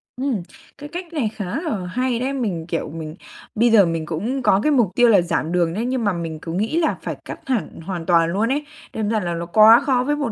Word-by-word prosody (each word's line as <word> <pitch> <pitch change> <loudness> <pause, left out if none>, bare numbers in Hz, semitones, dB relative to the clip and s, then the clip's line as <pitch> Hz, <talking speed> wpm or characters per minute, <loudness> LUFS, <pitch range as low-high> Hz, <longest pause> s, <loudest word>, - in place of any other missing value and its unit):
Ừm, 255 -6 -2 0.4
cái 290 +1 -9
cách 345 +1 -7
này 270 -9 0
khá 205 - -4 0.2
là 245 - -3
hay 250 +5 -1
đấy. 260 +3 -2
Mình, 200 -11 -2
kiểu, 165 -3 -3
mình 155 0 -7 0.4
bây 235 +2 +3
giờ 210 -4 +7
mình 165 -1 -2
cũng 210 - -3
có 195 -4 +4
cái 305 - +2
mục 245 -7 +4
tiêu 245 -1 +5
là 200 -5 +6
giảm 170 -1 -2
đường 170 -2 +1
đấy, 220 +6 -2
nhưng 255 -1 -1
mà 200 -2 +1
mình 165 -2 -5
cứ 165 - -6
nghĩ 215 - -1
là 325 - 0
phải - - -4
cắt - - -7
hẳn 250 -9 -2
hoàn 170 -1 -5
toàn 170 -2 +3
luôn 215 +4 +1
ấy, 290 +3 -1 0.3
đâm 215 -2 -2
ra 220 -1 +1
là 175 -3 -3
nó 170 0 -4
quá 215 +6 +7
khó 255 -3 +2
với 295 +3 0
một 290 -6 -2
215 Hz, 255 wpm, -21 LUFS, 170-255 Hz, 0.4 s, giờ